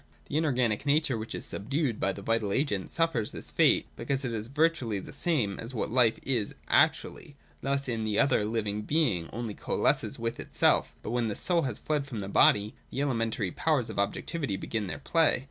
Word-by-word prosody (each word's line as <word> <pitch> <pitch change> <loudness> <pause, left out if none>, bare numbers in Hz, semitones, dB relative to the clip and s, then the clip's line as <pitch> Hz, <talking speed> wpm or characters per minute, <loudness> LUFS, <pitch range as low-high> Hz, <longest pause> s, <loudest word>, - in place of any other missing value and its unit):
The 145 - -2
inorganic 130 -6 +1
nature 145 -2 +2
which 110 0 -5
is - - -2
subdued 130 +2 -1
by 95 - +1
the 100 +1 -8
vital 115 -2 0
agent 105 -6 0
suffers 165 -10 0
this - - -8
fate, - - +4
because 135 0 -2
it 120 - -2
is 110 0 -3
virtually 135 -6 +1
the - - -10
same 125 - 0
as 120 +3 -6
what 110 - -2
life 120 -2 +4
is 120 -6 0
actually. 145 - +2 0.3
Thus 140 0 -1
in 115 -3 -2
the 105 -1 -1
other 140 -2 +4
the 105 - -1
living 105 -1 -1
being 105 - +1
only 115 -2 -4
coalesces - - 0
with 115 0 -3
itself - - +2
But - - -4
when 120 -1 0
the 105 - -3
soul 175 -2 +2
has 110 - -3
fled 150 -2 -2
from 115 -7 -5
the 95 - -5
body, 105 +1 +4 0.2
the - - -5
elementary 115 -7 -1
powers 145 - 0
of - - -5
objectivity 100 +4 -2
begin 105 +1 -3
their - - -4
play. 165 -5 +2
115 Hz, 200 wpm, -29 LUFS, 105-140 Hz, 0.3 s, fate